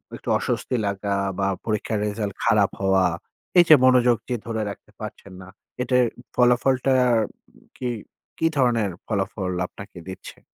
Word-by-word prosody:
একটু -, -, -14 dB
অস্বস্তি -, -, -2 dB
লাগা 100 Hz, 0 st, -1 dB, 0.2 s
বা 95 Hz, -, +1 dB, 0.2 s
পরীক্ষার 110 Hz, -1 st, -1 dB
রেজাল্ট 105 Hz, -1 st, -3 dB
খারাপ 105 Hz, -4 st, +4 dB
হওয়া। 95 Hz, -1 st, +3 dB, 0.5 s
এই 175 Hz, -, +9 dB
যে 155 Hz, -, +11 dB
মনোযোগ 125 Hz, -2 st, +5 dB
যে 125 Hz, -, 0 dB
ধরে 115 Hz, -2 st, -2 dB
রাখতে 100 Hz, -, -10 dB
পারছেন 100 Hz, -, -8 dB
না। 90 Hz, -, -11 dB, 0.3 s
এটার 125 Hz, -1 st, +3 dB
উ -, -, -10 dB
ফলাফলটা 125 Hz, +2 st, +3 dB, 0.2 s
আম 110 Hz, -2 st, +2 dB, 0.5 s
কি 125 Hz, -, -2 dB, 0.5 s
কি -, -, 0 dB
ধরনের 115 Hz, -6 st, +2 dB, 0.2 s
ফলাফল 95 Hz, -2 st, -2 dB, 0.2 s
আপনাকে 100 Hz, -1 st, -12 dB
দিচ্ছে? 95 Hz, -, -9 dB
110 Hz, 150 wpm, -23 LUFS, 100-125 Hz, 0.5 s, যে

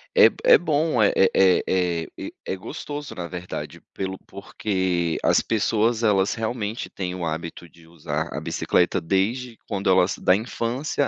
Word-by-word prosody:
É 470 Hz, -, +8 dB
é -, -, +8 dB
bom, 155 Hz, -6 st, +1 dB
é 100 Hz, -, +5 dB, 0.2 s
é 95 Hz, -1 st, +4 dB
é 90 Hz, -3 st, 0 dB
e -, -, -7 dB
é -, -, -2 dB
gostoso, 145 Hz, +9 st, -7 dB
na 85 Hz, -1 st, -5 dB
verdade, 90 Hz, 0 st, -7 dB
pelo 95 Hz, 0 st, -5 dB
porque 95 Hz, -4 st, -2 dB
as -, -, +4 dB
pessoas 115 Hz, +1 st, +1 dB
elas 100 Hz, -2 st, +2 dB
realmente 110 Hz, -1 st, -3 dB
têm 90 Hz, -1 st, -4 dB
o 90 Hz, -, -4 dB
hábito 80 Hz, +2 st, -5 dB
de 85 Hz, 0 st, -20 dB
usar 85 Hz, -2 st, -4 dB
a -, -, -3 dB
bicicleta -, -, +1 dB
desde 115 Hz, +7 st, -1 dB
quando 100 Hz, -2 st, -1 dB
elas, 95 Hz, 0 st, +4 dB
da 90 Hz, -, +4 dB
infância 125 Hz, +6 st, -2 dB
95 Hz, 155 wpm, -24 LUFS, 90-115 Hz, 0.2 s, É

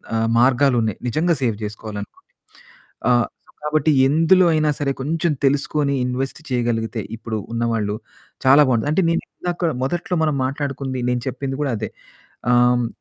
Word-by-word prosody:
ఆహ్, 115 Hz, 0 st, +1 dB
మార్గాలు 130 Hz, +2 st, +4 dB
ఉన్నాయి. 110 Hz, -3 st, -2 dB
నిజంగా 165 Hz, +7 st, +1 dB
సేవ్ 115 Hz, -4 st, 0 dB
చేసుకోవాలనుకుంటే. 105 Hz, -1 st, -7 dB, 0.9 s
ఆహ్, 120 Hz, -2 st, +3 dB, 0.4 s
కాబట్టి 155 Hz, 0 st, +2 dB, 0.2 s
ఎందులో 165 Hz, +6 st, +4 dB
అయినా 155 Hz, -1 st, +2 dB
సరే 140 Hz, -2 st, 0 dB
కొంచెం 165 Hz, +4 st, 0 dB
తెలుసుకొని 140 Hz, +1 st, +1 dB
ఇన్వెస్ట్ 130 Hz, +3 st, -3 dB
చేయగలిగితే, 115 Hz, -3 st, -1 dB
ఇప్పుడు 115 Hz, -1 st, -5 dB, 0.2 s
ఉన్నవాళ్ళు 115 Hz, -3 st, -1 dB, 0.5 s
చాలా 135 Hz, +3 st, +7 dB
బావుంటుంది. 125 Hz, +2 st, +1 dB
అంటే 160 Hz, -, +3 dB
నేనిందాక 170 Hz, 0 st, -2 dB
మొదట్లో 175 Hz, +6 st, -1 dB
మనం 155 Hz, -2 st, +1 dB
మాట్లాడుకుంది 135 Hz, -1 st, -3 dB
నేను 125 Hz, 0 st, 0 dB
చెప్పింది 135 Hz, +1 st, -3 dB
గూడా 140 Hz, -4 st, 0 dB
అదే. 105 Hz, -1 st, -4 dB, 0.6 s
ఆహ్, 120 Hz, -, +5 dB, 0.2 s
హ్మ్. 120 Hz, -1 st, 0 dB
135 Hz, 140 wpm, -21 LUFS, 115-150 Hz, 0.9 s, చాలా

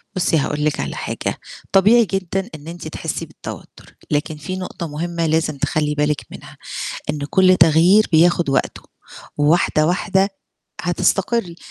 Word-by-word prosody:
بُصّي 175 Hz, -3 st, +2 dB
هاقول 150 Hz, +1 st, -1 dB
لِك 150 Hz, -, 0 dB
على -, -, -3 dB
حاجة، -, -, -4 dB, 0.3 s
طبيعي 210 Hz, +5 st, +5 dB
جدًا 195 Hz, +1 st, -3 dB
إن 150 Hz, 0 st, -12 dB
أنتِ 170 Hz, -1 st, -7 dB
تحسّي 160 Hz, +1 st, -4 dB
بالتوتُّر، 155 Hz, -, -11 dB, 0.2 s
لكن 150 Hz, +1 st, -1 dB
في 150 Hz, +5 st, -5 dB
نقطة 180 Hz, -2 st, -5 dB
مهمة 165 Hz, +2 st, -3 dB
لازم 160 Hz, -2 st, 0 dB
تخلّي 150 Hz, +1 st, -1 dB
بالِك 150 Hz, 0 st, 0 dB
منها، -, -, -12 dB, 0.5 s
إن 150 Hz, -, -4 dB
كل 185 Hz, -1 st, +5 dB
تغيير 170 Hz, +6 st, +5 dB
بياخُد 170 Hz, 0 st, +4 dB
وقته، 135 Hz, -, -1 dB, 0.6 s
وواحدة 155 Hz, 0 st, +3 dB
واحدة 190 Hz, +2 st, +1 dB, 0.5 s
هتستقرّي. 180 Hz, +2 st, 0 dB
165 Hz, 140 wpm, -20 LUFS, 155-185 Hz, 0.6 s, طبيعي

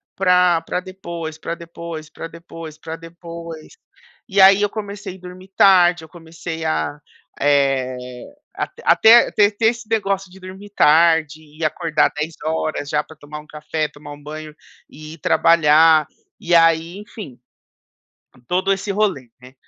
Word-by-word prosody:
pra 180 Hz, -3 st, +3 dB
pra 165 Hz, -, -3 dB
depois 170 Hz, -4 st, -8 dB
pra 165 Hz, -, -5 dB
depois, 170 Hz, -2 st, -9 dB
pra 165 Hz, -, -8 dB
depois, 165 Hz, -1 st, -11 dB
pra 160 Hz, +1 st, -7 dB
depois, 165 Hz, -1 st, -10 dB, 0.6 s
e 195 Hz, +1 st, 0 dB
aí, 195 Hz, +1 st, +7 dB
eu 205 Hz, -, +2 dB
comecei 200 Hz, -3 st, -7 dB
dormir 185 Hz, +1 st, -12 dB
tarde, 175 Hz, -3 st, +5 dB
eu -, -, -19 dB
comecei 165 Hz, -1 st, -8 dB
a, 80 Hz, -, -1 dB, 0.4 s
eh, 135 Hz, -3 st, +1 dB, 0.6 s
até -, -, -6 dB, 0.4 s
até -, -, -8 dB, 0.2 s
te 205 Hz, -, -31 dB
ter 225 Hz, -, 0 dB
esse 230 Hz, -1 st, -2 dB
negócio 195 Hz, -4 st, -1 dB
de 190 Hz, -, -15 dB
dormir 190 Hz, +2 st, -11 dB
tarde 160 Hz, -3 st, +3 dB
e 155 Hz, +1 st, -6 dB
acordar 155 Hz, -1 st, +1 dB
10h00 155 Hz, -1 st, -3 dB
já 150 Hz, 0 st, 0 dB
pra 160 Hz, -, -16 dB
tomar 150 Hz, +1 st, -9 dB
um 150 Hz, -, -15 dB
café, 150 Hz, +1 st, -3 dB
tomar 145 Hz, 0 st, -12 dB
um 145 Hz, -, -14 dB
banho 155 Hz, 0 st, -9 dB, 0.3 s
e 155 Hz, +1 st, -11 dB
ir 165 Hz, -, -22 dB
trabalhar, 160 Hz, -1 st, +4 dB, 0.3 s
e 175 Hz, 0 st, -2 dB
aí, 165 Hz, +2 st, +3 dB
enfim, 205 Hz, -, -11 dB, 1.1 s
todo 185 Hz, +2 st, 0 dB
esse 195 Hz, +1 st, -4 dB
rolê, 190 Hz, -, -1 dB
né. 130 Hz, +1 st, -15 dB
165 Hz, 150 wpm, -20 LUFS, 155-185 Hz, 1.1 s, aí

